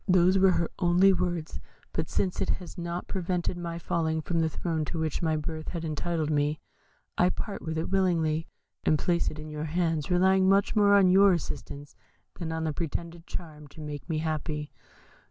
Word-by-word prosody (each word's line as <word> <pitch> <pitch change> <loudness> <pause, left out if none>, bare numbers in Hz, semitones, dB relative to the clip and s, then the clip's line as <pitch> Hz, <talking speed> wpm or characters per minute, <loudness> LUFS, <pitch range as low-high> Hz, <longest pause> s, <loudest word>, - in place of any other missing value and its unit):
Those 185 0 +5
were 190 -1 +5
her 170 - 0
only 180 +2 +5
words; 175 -3 -2 0.3
but - - -2
since 185 -2 -1
it - - 0
has 180 - -3
not 170 -1 -4
prevented 180 -2 -1
my 170 -1 -4
falling 160 -1 -1
from 165 +2 -1
the 160 -1 +2
throne 160 -1 -2
to 165 - -4
which 160 -2 -1
my 160 -2 +1
birth 155 +1 -5
had 170 -2 -4
entitled 155 0 -1
me, 150 +1 +1 0.6
I 180 - +5
part 205 +2 -4
with 160 0 -4
it 160 - -2
willingly, 165 -5 +1 0.4
and 155 - +3
place 170 +3 +1
it 155 - -9
in 155 0 -7
your 150 0 -4
hands, 160 -2 0
relying 190 +1 +4
much 195 +3 +3
more 205 -1 +5
on 190 -2 +6
your 195 +1 +6
assistance 145 -3 -5 0.4
than 165 -2 -3
on 160 0 -2
the 155 -1 -1
pretended 170 +1 -5
charm 150 -4 -7
to 140 - -15
make 150 +1 -7
me 160 - 0
happy.' 155 -1 -3
170 Hz, 190 wpm, -28 LUFS, 155-180 Hz, 0.6 s, on